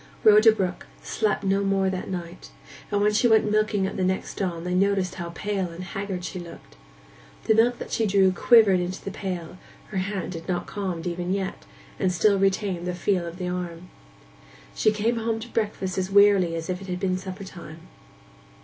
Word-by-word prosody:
Rhoda 215 Hz, +1 st, +7 dB
Brook 190 Hz, -4 st, -3 dB, 0.2 s
slept 215 Hz, -2 st, -1 dB
no 195 Hz, +1 st, +1 dB
more 195 Hz, -1 st, +1 dB
that 185 Hz, -1 st, -4 dB
night, 175 Hz, -1 st, -6 dB, 0.4 s
and 205 Hz, -, +1 dB
when 210 Hz, 0 st, +3 dB
she 230 Hz, +3 st, +3 dB
went 220 Hz, -2 st, +4 dB
milking 215 Hz, -2 st, +1 dB
at 195 Hz, -, -4 dB
the 185 Hz, -, 0 dB
next 185 Hz, +1 st, -1 dB
dawn 170 Hz, -4 st, -2 dB
they 180 Hz, 0 st, -2 dB
noticed 190 Hz, -1 st, +1 dB
how 175 Hz, -2 st, -6 dB
pale 200 Hz, -3 st, -2 dB
and 170 Hz, +2 st, -8 dB
haggard 195 Hz, -1 st, -5 dB
she 185 Hz, -, -5 dB
looked. 170 Hz, -, -12 dB, 0.7 s
The -, -, +3 dB
milk 235 Hz, +2 st, +3 dB
that -, -, -8 dB
she 225 Hz, -, +1 dB
drew 190 Hz, -1 st, +4 dB
quivered 205 Hz, -2 st, +5 dB
into 180 Hz, +1 st, -4 dB
the 195 Hz, -, -3 dB
pail; 180 Hz, -2 st, -5 dB, 0.3 s
her 195 Hz, -, -4 dB
hand 190 Hz, -1 st, -3 dB
had 165 Hz, -1 st, -8 dB
not 180 Hz, -2 st, -1 dB
calmed 185 Hz, -5 st, -4 dB
even 175 Hz, +1 st, -3 dB
yet, 190 Hz, -1 st, -3 dB, 0.3 s
and 185 Hz, -, +2 dB
still 200 Hz, +2 st, +3 dB
retained 190 Hz, -2 st, 0 dB
the 180 Hz, -, -2 dB
feel 180 Hz, -1 st, 0 dB
of 170 Hz, +1 st, -8 dB
the 180 Hz, -1 st, -4 dB
arm. 180 Hz, -1 st, -5 dB, 0.8 s
She 215 Hz, -, +2 dB
came 220 Hz, +3 st, 0 dB
home 225 Hz, 0 st, -1 dB
to 225 Hz, -, -8 dB
breakfast 200 Hz, -5 st, -2 dB
as 185 Hz, 0 st, -2 dB
wearily 200 Hz, -4 st, +5 dB
as 165 Hz, 0 st, -4 dB
if 185 Hz, 0 st, -3 dB
it 195 Hz, -, -9 dB
had 180 Hz, -1 st, -3 dB
been 185 Hz, -1 st, 0 dB
suppertime. 185 Hz, -4 st, -9 dB
190 Hz, 195 wpm, -25 LUFS, 180-205 Hz, 0.8 s, Rhoda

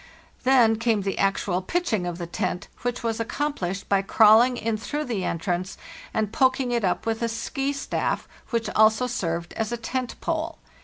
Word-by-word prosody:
Then 240 Hz, -4 st, +5 dB
came 230 Hz, -2 st, +1 dB
the 195 Hz, 0 st, -2 dB
actual 195 Hz, -2 st, +1 dB
pitching 220 Hz, -, -1 dB
of 175 Hz, -1 st, -4 dB
the 175 Hz, -, -4 dB
tent, 180 Hz, +1 st, -3 dB
which 245 Hz, 0 st, -2 dB
was 225 Hz, -1 st, -1 dB
accomplished 230 Hz, -7 st, -2 dB
by 200 Hz, -1 st, +3 dB
crawling 225 Hz, +5 st, +5 dB
in 225 Hz, -1 st, -1 dB
through 295 Hz, +8 st, -3 dB
the 230 Hz, -9 st, -2 dB
entrance 180 Hz, +3 st, -2 dB, 0.3 s
and 215 Hz, -1 st, -1 dB
poking 260 Hz, -1 st, +2 dB
it 235 Hz, -2 st, 0 dB
up 185 Hz, +2 st, 0 dB
with 225 Hz, 0 st, -1 dB
a 230 Hz, -, +1 dB
"ski" 270 Hz, +5 st, -2 dB
staff, 280 Hz, -1 st, -2 dB, 0.2 s
which 230 Hz, -1 st, -1 dB
also 220 Hz, +3 st, +4 dB
served 170 Hz, -8 st, -3 dB
as 220 Hz, -1 st, -2 dB
tent 255 Hz, 0 st, -3 dB
pole. 325 Hz, 0 st, -2 dB
225 Hz, 170 wpm, -25 LUFS, 195-250 Hz, 0.3 s, Then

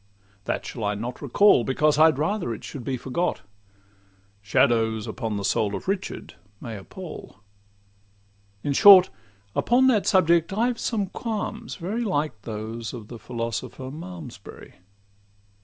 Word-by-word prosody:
That -, -, -2 dB
shall 115 Hz, -, -6 dB
I 105 Hz, 0 st, 0 dB
not 120 Hz, +4 st, -6 dB
recall, 145 Hz, -, +4 dB
Because 150 Hz, +4 st, +2 dB
I'd 160 Hz, -3 st, +6 dB
rather 155 Hz, -, -1 dB
it -, -, -13 dB
should 135 Hz, -, -7 dB
be 130 Hz, 0 st, -2 dB
forgot, 130 Hz, -, -2 dB, 1.0 s
'Shadows 110 Hz, +1 st, +2 dB
the 110 Hz, -3 st, -4 dB
soul 100 Hz, +1 st, 0 dB
of -, -, -7 dB
Richard' 195 Hz, 0 st, -3 dB, 0.3 s
may 115 Hz, -3 st, -7 dB
appal. 105 Hz, -, -10 dB, 1.2 s
In 145 Hz, -, 0 dB
short, 190 Hz, +3 st, +8 dB, 0.4 s
upon 250 Hz, +2 st, +3 dB
that 215 Hz, -6 st, +2 dB
subject 170 Hz, -1 st, +3 dB
I've 235 Hz, +3 st, 0 dB
some 215 Hz, -4 st, -1 dB
qualms 220 Hz, +2 st, -5 dB
very 205 Hz, +7 st, -3 dB
Like 150 Hz, -, -2 dB
those 110 Hz, +2 st, -6 dB
of 110 Hz, -3 st, -10 dB
the 120 Hz, -, -9 dB
philosopher 115 Hz, +1 st, -5 dB
of 130 Hz, +1 st, -7 dB
Malmsbury. 160 Hz, -, -10 dB
135 Hz, 135 wpm, -25 LUFS, 115-185 Hz, 1.2 s, short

